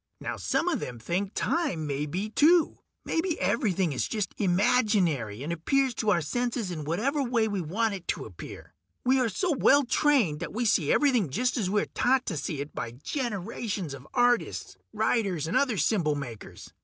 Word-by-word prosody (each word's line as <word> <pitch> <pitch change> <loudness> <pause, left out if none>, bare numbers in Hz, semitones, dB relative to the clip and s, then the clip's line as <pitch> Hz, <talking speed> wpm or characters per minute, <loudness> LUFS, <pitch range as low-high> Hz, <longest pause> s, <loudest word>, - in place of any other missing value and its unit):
Now - - -4
some - - -1
of - - +1
them 120 - -6
think 185 - -2
time 285 - 0
may 145 +1 -2
be, 185 +8 -3
too. 325 +6 +4 0.3
Maybe 335 0 -1
everything 190 - +1
is 130 - -1
just 210 -5 -2
imaginary, 180 - +2
and 165 +4 -2
appears 265 - +1
to 215 - 0
our 175 -4 +3
senses 235 +3 -2
in 155 -4 -5
whatever 250 - 0
way 240 -4 +1
we 200 -3 -2
want 210 +7 0
it 190 -3 -8
to - - -2
appear. - - -10 0.3
We 260 +1 +4
are 250 -3 +2
so 355 - -1
well 280 +2 +5
trained 245 - +2
that 170 - -5
we 240 +3 -1
see 170 -8 +2
everything 250 - +3
just 250 - 0
as 210 -8 0
we 205 +1 +2
are - - -11
taught 260 +1 +2
to 175 - -3
see 140 0 -3
it 145 - -7
by 115 - -5
generations 210 - -3
of 135 +1 -10
artists, 245 -1 +1 0.2
writers, 215 -7 0
and 165 - -3
other 250 -7 +2
symbol 170 -8 +1
makers. 125 -7 -8
205 Hz, 190 wpm, -28 LUFS, 160-245 Hz, 0.3 s, well